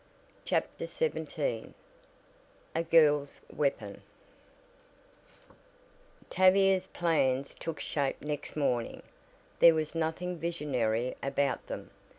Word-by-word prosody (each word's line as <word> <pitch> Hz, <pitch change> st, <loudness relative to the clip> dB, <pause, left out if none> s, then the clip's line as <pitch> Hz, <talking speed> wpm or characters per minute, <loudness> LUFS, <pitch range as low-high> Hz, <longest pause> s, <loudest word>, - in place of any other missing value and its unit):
CHAPTER -, -, -1 dB
XVII 485 Hz, +1 st, -3 dB, 1.0 s
A 165 Hz, -, +1 dB
GIRL'S 150 Hz, -4 st, +3 dB, 0.2 s
WEAPON 110 Hz, -9 st, -1 dB, 2.3 s
Tavia's 190 Hz, 0 st, +4 dB
plans 140 Hz, -6 st, 0 dB
took 165 Hz, -1 st, -6 dB
shape 140 Hz, -3 st, -1 dB
next 150 Hz, -1 st, -5 dB
morning 125 Hz, -6 st, -1 dB, 0.6 s
there 165 Hz, -1 st, +8 dB
was 155 Hz, -1 st, -2 dB
nothing 165 Hz, +2 st, -2 dB
visionary 130 Hz, -8 st, -1 dB
about 140 Hz, 0 st, -1 dB
them. -, -, -7 dB
155 Hz, 85 wpm, -30 LUFS, 135-170 Hz, 2.3 s, there